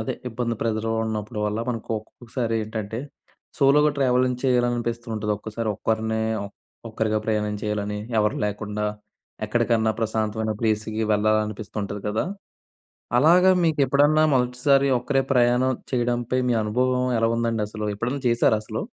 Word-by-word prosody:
అదే 110 - -2
ఇబ్బంది 120 0 -2
ప్రెషర్‌గా 110 0 -1
ఉన్నప్పుడు 110 0 -4
వల్ల 105 +1 -2
మనకు 115 -3 -4
ఒక్కొక్కసారి 115 +2 -5
ఏంటంటే, 110 0 -5 0.6
సోలోగా 150 +2 +5
ట్రావెలింగ్ 125 -1 +2
చేయాలనిపిస్తూ 120 -2 0
ఉంటుది. 105 0 -2
ఒక్కోసారి 110 +2 -4
ఒక్కరినే 110 +1 -1 0.7
ఒక్కరిగా 110 -1 0
ప్రయాణం 105 -1 0
చేయాలని, 105 -1 -2 0.2
ఎవరు 105 0 +1
లేకుండా 105 0 -3 0.6
ఎక్కడికన్నా 110 -1 +1
ప్రశాంతమైన 110 0 -1
ప్లేస్‍కి 110 0 0
వెళ్ళాలనిపిస్తూ 110 -1 0
ఉంటది 100 0 -5
గదా! 105 +2 0 0.9
అలాగే 175 +7 +6
మీకెప్పుడన్నా 145 0 +3
మొదటిసారి 130 +2 +2
ఒక్కరే 135 +2 0
ప్రయాణం 125 +1 +3 0.2
చేయడంపై 120 0 0
మీ - - +3
అనుభవం 125 +4 +1
ఎలా 115 - +3
ఉందండి 115 -2 0
అసలు? 105 0 -6
ఎప్పుడన్నా 125 +7 -3
చేశారా 115 -2 +3
అసలు? 110 0 -5
115 Hz, 125 wpm, -24 LUFS, 110-125 Hz, 0.9 s, అలాగే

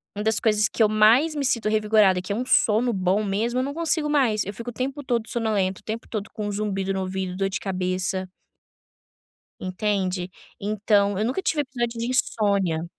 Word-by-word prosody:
uma 210 - -3
das 220 0 +2
coisas 210 -1 +2
que - - -3
eu 210 - +4
mais 230 +9 +4
me 280 -2 -1
sinto 230 -4 +1
revigorada 215 -3 +3
que 200 - -3
é - - -2
um 245 - -1
sono 235 +1 +3
bom 190 +2 +1
mesmo 225 +5 -1
eu - - +1
não 280 +1 -3
consigo 320 -2 0
mais. 250 -8 +2
Eu 200 - -5
fico 235 +4 -6
o - - -17
tempo 275 +4 -3
todo 235 -3 -1
sonolenta 205 -5 -1
o - - -44
tempo 220 +1 -5
todo 215 -1 -4
com 210 -2 -3
zumbido 195 -2 -2
no 190 - -2
ouvido, 185 -1 -3
dor 195 0 0
de 195 - -3
cabeça. 185 0 -2 1.3
Entende? 185 -1 -2 0.3
Então 205 -1 +1
eu 210 - 0
nunca 260 +11 -1
tive 305 -4 +1
episódio 240 -4 -3
de 235 - -2
insônia. 200 -9 +1
215 Hz, 200 wpm, -24 LUFS, 195-235 Hz, 1.3 s, eu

